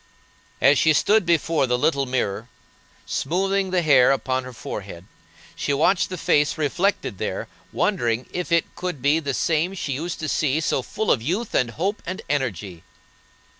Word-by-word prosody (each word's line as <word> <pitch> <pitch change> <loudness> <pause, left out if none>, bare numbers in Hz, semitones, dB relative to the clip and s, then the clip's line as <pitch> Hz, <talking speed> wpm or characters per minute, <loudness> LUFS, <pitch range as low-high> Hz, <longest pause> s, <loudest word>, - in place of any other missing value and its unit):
As 135 +1 +5
she 160 - +4
stood 205 +5 +3
before 165 -4 +2
the 125 0 +1
little 140 +1 +1
mirror, 120 -3 -2 0.6
smoothing 195 +5 0
the 180 -1 +1
hair 140 -4 +5
upon 130 -1 -1
her 130 - -8
forehead, 95 -6 -7 0.5
she 140 - -1
watched 175 +6 +2
the 185 - -5
face 145 -2 +2
reflected 160 - -1
there, - - -3 0.2
wondering 120 0 0
if 180 -1 -4
it 170 -1 +1
could 180 -8 -5
be 145 +3 +3
the 140 -4 -3
same 170 +4 0
she 155 - -4
used 165 +6 -4
to 155 - -2
see 150 0 +1
so 150 -4 0
full 220 - -2
of 120 - +2
youth 190 - -2
and 125 -2 +2
hope 190 - -2
and 185 +2 -6
energy. 100 - -2
145 Hz, 170 wpm, -23 LUFS, 130-175 Hz, 0.6 s, As